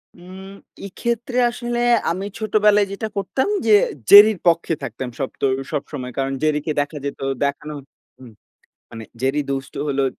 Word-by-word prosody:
উম 190 +2 -12 0.4
এক্ষেত্রে 235 +4 -3
আসলে 240 0 -4 0.3
আমি 190 +3 -4
ছোটবেলায় 210 -1 +3
যেটা 215 +2 -4
করতাম 265 - -1 0.2
যে 215 -2 +6 0.3
জেরির 205 -1 +9
পক্ষে 165 -1 +2
থাকতাম 130 -2 -5
সবতো 135 +1 -3 0.3
সবসময়। 135 -4 -5
কারণ 135 0 -1
জেরিকে 155 0 0
দেখা 145 +1 -5
যেত 140 - -5 0.3
দেখানো 150 +2 -4 0.5
উম 120 -3 -12 0.6
মানে 115 -1 -9 0.2
জেরি 135 +3 0
দুষ্ট 135 0 -4
হলো 140 -1 0
170 Hz, 135 wpm, -20 LUFS, 140-210 Hz, 0.6 s, জেরির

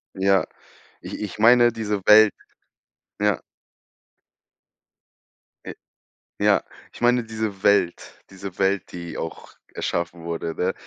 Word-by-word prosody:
Ja, 95 0 +2 0.6
ich - - -8
ich 105 -3 -6
meine 120 +2 +6
diese 105 -3 -3
Welt, 105 -1 +7 0.9
ja. 105 -1 +1 2.2
Äh. - - -7 0.7
Ja, - - +3 0.3
ich - - -14
meine 120 0 +3
diese 110 -3 -5
Welt 100 -4 +1
diese 95 -1 -9
Welt, 95 0 0
die 85 -1 -7
auch 80 - -7 0.2
erschaffen 85 0 -3
wurde, 85 -1 -4
ne? 95 +1 -1
100 Hz, 110 wpm, -23 LUFS, 90-110 Hz, 2.2 s, Welt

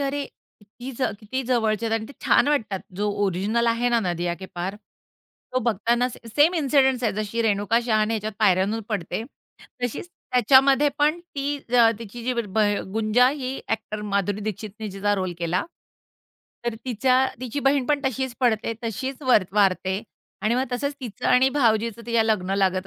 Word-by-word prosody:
अरे 280 +1 -1 0.4
किती 225 +5 -10
ज - - -2 0.2
किती 260 +5 -3
जवळचे 230 -3 0
आहेत 225 - 0
आणि 220 -1 -2
ते - - -10
छान 285 - +4
वाटतात 215 -10 0 0.2
जो 205 +1 0 0.2
ओरिजिनल 200 +5 0
आहे 230 +1 +2
ना, 235 -1 +2
नदिया 175 -3 -1
के 190 +2 -9
पार, 180 +3 -3 0.8
तो 255 - +2
बघताना 235 +1 +1
सेम 290 +8 +1
इन्सिडन्स 270 -5 +2
आहेत. 225 - +1
जशी 215 +2 -2
रेणुका 205 +1 +2
शहाणे 215 -1 +2
ह्याच्यात 215 0 -3
पायऱ्यांहून 200 +1 +2
पडते, 210 -1 -3 0.6
तशीच 245 +8 -3 0.2
त्याच्यामध्ये 270 +4 +5
पण 305 +4 +2
ती 290 -4 -3 0.2
अ, 230 -1 +7
तिची 230 +1 -9
जी 255 - 0
ब 220 -3 -2 0.3
गुंजा 225 +3 +3
ही 265 -1 -3
अ‍ॅक्टर 215 -1 -3
माधुरी 200 +1 0
दीक्षितने 215 +1 -5
जिचा 200 +1 0
रोल 185 -2 -2
केला, 175 +1 0 1.0
तर 235 -1 -1
तिच्या 255 +2 +2
तिची 255 +2 -3
बहीण 275 -1 +2
पण 290 0 +1
तशीच 260 -1 -1
पडते, 230 -2 +1
तशीच 260 +5 -4
वर 250 -7 +4
वारते 195 -1 +2 0.4
आणि 220 +2 +2
मग 255 +2 +1
तसंच 280 +3 -1
तीचं 235 -6 -5
आणि 255 +1 +5
भावजीचं 230 -4 +1
तिच्या 230 -1 +3
लग्न 195 -4 0
लागत 190 -1 +1
230 Hz, 165 wpm, -24 LUFS, 205-255 Hz, 1.0 s, अ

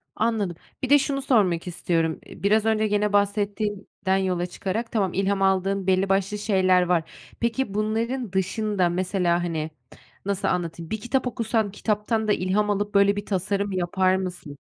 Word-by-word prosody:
Anladım. 215 -6 0 0.3
Bir 260 - -1
de 290 0 +7
şunu 275 0 -1
sormak 195 -11 +2
istiyorum, 165 -2 -1
eee, - - -13
biraz 215 +2 +3
önce 220 -1 +2
gene 210 0 +1
bahsettiğinden 205 -1 0
yola 185 -2 0
çıkarak, 200 +6 -4
tamam, 195 -5 0
ilham 195 0 0
aldığın 195 0 +1
belli 190 +1 +2
başlı 195 +2 +1
şeyler 190 -3 +3
var. 175 -2 0 0.3
Peki 235 -1 -1
bunların 225 +2 -1
dışında, 190 0 0
mesela, 175 -1 0
hani, 160 -2 -2 0.6
nasıl 200 0 0
anlatayım, 170 -2 -2
bir 220 -1 -3
kitap 255 +2 0
okusan 225 -3 0
kitaptan 215 +2 -1
da 210 - +4
ilham 200 +3 0
alıp 205 0 -1
böyle 200 0 +5
bir 205 0 -4
tasarım 200 +1 -1
yapar 185 +1 +1
mısın? 180 -6 -5
200 Hz, 160 wpm, -24 LUFS, 185-215 Hz, 0.6 s, de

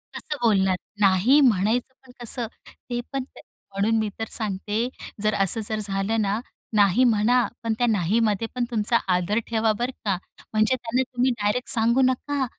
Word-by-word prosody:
कसं 300 - -5
बोलणार? 195 -4 +3 0.2
नाही 200 +8 +4
म्हणायचं 235 +1 +2
पण 255 - -15
कसं? 235 0 0 0.4
ते 240 -1 -2
पण 270 -1 -1
ते 260 - -16 0.3
म्हणून 205 +3 +1
मी 215 -1 -1
तर 225 - -1
सांगते 210 +2 -2 0.4
जर 215 0 +2
असं 195 +4 +4
जर 215 -1 -1
झालं 200 +2 -1
ना, 205 +1 0 0.4
नाही 205 +3 +4
म्हणा, 235 0 +3 0.2
पण 230 -1 0
त्या 245 - +2
नाहीमध्ये 215 +2 +1
पण 245 -1 0
तुमचा 230 +1 +2 0.2
आदर 180 +5 0
ठेवा 225 -1 +1
बरं 245 +2 -1
का. 195 -3 +1 0.4
म्हणजे 220 +4 +3
त्यांना 245 0 -1
तुम्ही 250 +1 +2
डायरेक्ट 210 +5 0
सांगू 235 +3 +3
नका, 265 +2 0
225 Hz, 165 wpm, -24 LUFS, 205-245 Hz, 0.4 s, नाही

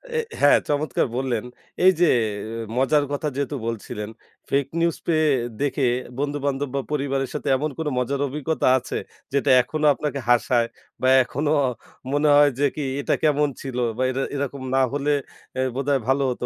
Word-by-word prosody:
এ - - +2 0.2
হ্যাঁ, - - +6
চমৎকার 145 -1 0
বললেন 125 -4 -1 0.4
এইযে 180 -2 +5 0.7
মজার 145 +3 +3
কথা 145 +1 -2
যেহেতু 140 +1 -2
বলছিলেন। 105 -2 -5 0.4
ফেক 140 0 +2
নিউজ 170 -1 +1
পেয়ে 155 -2 +3 0.3
দেখে 145 -1 +1 0.3
বন্ধু-বান্ধব 145 0 -1
বা 140 - +1
পরিবারের 135 -2 -1
সাথে 150 - -5
এমন 150 +3 -1
কোনো 160 -2 -1
মজার 135 +2 -1
অভিজ্ঞতা 150 +3 -1
আছে? 130 - -4 0.4
যেটা 140 0 +1
এখনো 155 +4 -2
আপনাকে 140 +2 -3
হাসায় 120 -1 +3 0.3
বা 130 - +2 0.2
এখনো 145 +4 -2 0.6
মনে 145 +2 +2
হয় 145 0 +7
যে - - +1
কি 155 - -3 0.2
এটা - - 0
কেমন 150 -1 +3
ছিল 130 -3 -5 0.2
বা 130 - +1
এর 130 - -3 0.2
এরকম 140 -1 -3
না - - +4
হলে 145 +1 0 0.5
এ - - -1 0.2
বোধহয় 140 +1 +1
ভালো 135 +1 +2
হতো। 120 - -4
140 Hz, 160 wpm, -23 LUFS, 130-150 Hz, 0.7 s, হয়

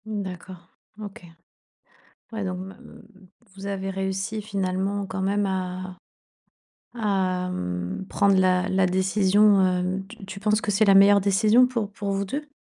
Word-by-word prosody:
Mmh 215 -2 -4
d'accord, 180 -1 -9 0.3
OK. 205 0 -9 1.1
Ouais, 220 -2 -4
donc 185 -1 -3
m 190 +1 -8
mmh 210 -5 -17 0.3
vous 195 0 -9
avez 195 -1 -3
réussi 195 +3 -3
finalement 195 -1 -2
quand 190 0 -4
même 200 +2 0
à 185 -1 -4 1.0
à 190 -5 -1
mmh, 90 - -4
prendre 200 -2 +2
la 185 0 +2
la 190 0 +2
décision, 195 +2 +3
hem 185 +1 -1
tu 225 -1 -12
tu 195 0 -8
penses 210 +1 +1
que - - -4
c'est 205 +2 +3
la 200 - +6
meilleure 200 +1 +7
décision 215 +5 +4
pour 230 -5 -3
pour 200 0 -4
vous 195 0 -1
2? 290 +9 -5
195 Hz, 155 wpm, -24 LUFS, 185-205 Hz, 1.1 s, meilleure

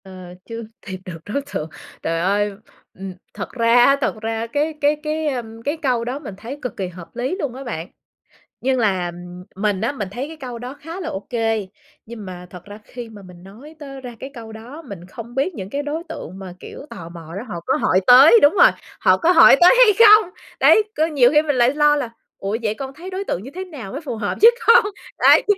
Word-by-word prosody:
Ờ, 185 -2 -11
chưa 230 0 -7 0.2
tìm 190 -1 -6
được 180 -3 -7
đối 250 +7 -2
tượng. 155 - -3 0.3
Trời 165 0 -1
ơi, 205 +4 +1 0.4
ừm, 190 0 -8 0.2
thật - - -6
ra 230 -1 +2
á, 275 - +5
thật 255 - 0
ra 225 +1 -3
cái 295 +6 -1
cái 295 +1 +3
cái, 310 +1 -2
a, 260 -4 -1 0.2
cái 290 +3 -1
câu 250 -5 0
đó 255 +4 -4
mình 250 -9 -8
thấy 240 +8 -8
cực 250 - -6
kỳ 190 - -3
hợp 180 +2 -12
lý 255 +8 -2
luôn 275 -8 -3
á 270 - -8
bạn. 175 -9 -5 0.7
Nhưng 260 0 +1
là 190 -6 0 0.4
mình 200 -1 -1
á, 225 - 0
mình 215 -9 -5
thấy 250 +7 -5
cái 320 +1 -10
câu 250 -5 -7
đó 250 +2 -7
khá 330 +4 -8
là 335 -4 -4
ô 190 - -4
kê, 225 -4 -1 0.4
nhưng 225 -2 -9
mà 180 -1 -9
thật 180 -1 -11
ra 205 +1 -11
khi 240 +1 -9
mà 210 -2 -12
mình 180 -2 -14
nói 240 +12 -14
tới 275 -2 -9
ra 245 -2 -9
cái 270 - -8
câu 225 -4 -10
đó, 235 +8 -10
mình 200 - -10
không 230 +6 -10
biết 280 +8 0
những 190 -1 -7
cái 285 +6 -3
đối 305 +3 -4
tượng 185 +4 -8
mà, 190 -2 -8
kiểu, 280 - -10
tò 165 -1 -9
mò 165 -1 -11
đó 205 - -5
họ 175 -6 -5
có - - +1
hỏi 185 - +2
tới 275 - +9
đúng 290 - +6
rồi, - - +6 0.3
họ - - +4
có 340 +1 +3
hỏi 335 -5 +8
tới 355 +7 +8
hay - - +7
không. 425 -2 +7 0.3
Đấy, 435 - +6
có 315 - +3
nhiều 280 -7 +4
khi 300 - +6
mình 295 -2 -1
lại 245 +1 +3
lo 295 0 +4
là 280 -5 -2 0.3
"Ủa, 200 +3 -3
vậy 215 -1 -1
con 270 +2 -7
thấy 340 +6 -9
đối 380 +1 -4
tượng 185 - -3
như 265 - -9
thế 375 +1 -5
nào 270 - -9
mới 280 - -6
phù 290 -7 -5
hợp 215 -2 -3
với 460 +2 +9 0.2
con?" 465 -1 +7 0.3
Đấy, - - +6
240 Hz, 240 wpm, -20 LUFS, 200-290 Hz, 0.7 s, tới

